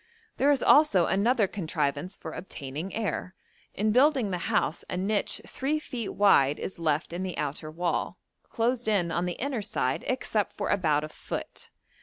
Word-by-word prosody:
There 280 - +3
is 285 -3 +3
also 285 - +6
another 215 +3 +3
contrivance 175 -1 -2
for - - -7
obtaining 155 +1 -6
air; 195 -3 -3 0.4
in 215 +2 +1
building 255 -3 +4
the 180 - -1
house 165 - 0
a - - -2
niche 200 +2 0
three 290 +3 -1
feet 245 -8 -5
wide 150 -9 +5
is 185 - -6
left 160 0 0
in 175 - -3
the 185 -2 -4
outer 150 +1 -3
wall, 170 +2 -2 0.3
closed 240 0 0
in 190 -6 +2
on 170 +2 0
the 175 - -1
inner 265 0 -2
side 195 -11 -1
except 225 -5 -1
for 205 - -2
about 155 -7 +2
a 155 - -5
foot. - - -7
195 Hz, 170 wpm, -28 LUFS, 165-230 Hz, 0.4 s, also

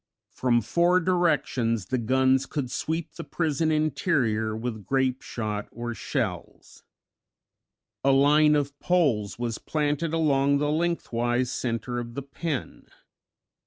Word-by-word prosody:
From 120 -2 +1
four 170 - +3
directions 150 - +1
the 130 +7 -1
guns 130 +3 +2
could 135 -5 -3
sweep 160 +4 -3
the - - -7
prison 160 -1 0
interior 135 - +1
with 110 -2 -4
grapeshot 125 -5 -1
or 120 0 -5
shells. 110 - -4 1.2
A 135 - +3
line 150 +3 +5
of 145 -1 -2
poles 140 - +1
was 120 -2 -3
planted 150 +1 -1
along 140 -3 +2
the 145 +1 0
lengthwise 125 -7 0
center 120 0 -2
of 120 0 -7
the 140 - -4
pen. 140 +1 -5
135 Hz, 120 wpm, -26 LUFS, 120-155 Hz, 1.2 s, line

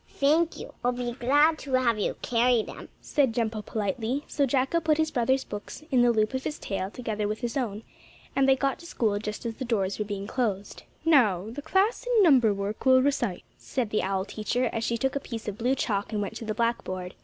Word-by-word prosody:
"Thank 315 +4 +2
you, - - -9
I'll 245 +1 +2
be 245 0 -3
glad 290 +6 +3
to 275 - -7
have 240 -4 +3
you - - -1
carry 240 -1 +3
them," - - -10
said 270 -6 +1
Jumpo 220 -2 -1
politely, 225 +7 -2
so 280 -2 +1
Jacko 270 +5 +1
put 315 -2 +2
his 315 -1 +1
brother's 260 +2 +1
books 205 +8 -8
in 255 -2 +4
the 245 - +5
loop 215 0 +1
of 260 0 -2
his 300 - -3
tail 195 -1 -3
together 215 -2 -3
with 215 +3 -3
his 240 -2 -3
own, 225 -6 -2 0.5
and 270 -1 +3
they 265 - +6
got 275 0 -1
to 340 - -11
school 215 -9 0
just 210 +2 -5
as 230 -1 -4
the 265 - -4
doors 200 -6 -1
were 210 - -1
being 200 -1 -4
closed. 205 -4 -2 0.2
"Now 220 - +4
the 290 - -6
class 385 +10 +1
in 420 - +7
number 260 - +6
work 200 +1 -3
will 260 -1 +6
recite," 240 -9 0 0.2
said 240 -5 -3
the 215 - +1
owl 190 0 -1
teacher, 225 +4 -1
as 225 - -2
she 235 - 0
took 265 +3 -1
a - - +1
piece 230 -4 -7
of 210 +2 -4
blue 250 +3 +2
chalk 205 -5 -1
and 215 - -1
went 200 -1 -3
to 230 - -7
the 215 -1 -3
blackboard. 185 -6 -2
235 Hz, 230 wpm, -27 LUFS, 210-270 Hz, 0.5 s, in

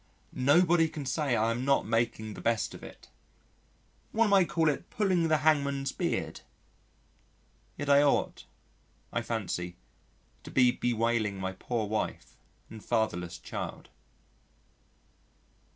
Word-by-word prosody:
Nobody 165 +5 +4
can 150 -3 -6
say 135 -1 0
I 115 +1 +2
am 120 +2 -2
not 140 0 +2
making 115 -1 -1
the - - -9
best 115 -1 0
of - - -10
it. - - -12 1.0
One 225 -1 +2
might 190 -3 +5
call 165 -1 +1
it 150 - -1
pulling 185 -5 +1
the 155 -1 +3
hangman's 140 -3 +2
beard. - - -3 1.4
Yet 145 - -4
I 140 0 +6
ought, 145 -1 +1 0.7
I 120 - 0
fancy, 95 -6 -3 0.7
to - - -9
be 125 -2 +4
bewailing 115 -4 0
my 95 0 -2
poor 110 +3 -3
wife 110 +1 -3 0.3
and 110 -2 -11
fatherless 90 -7 -1
child. - - -7
125 Hz, 125 wpm, -29 LUFS, 110-150 Hz, 1.4 s, I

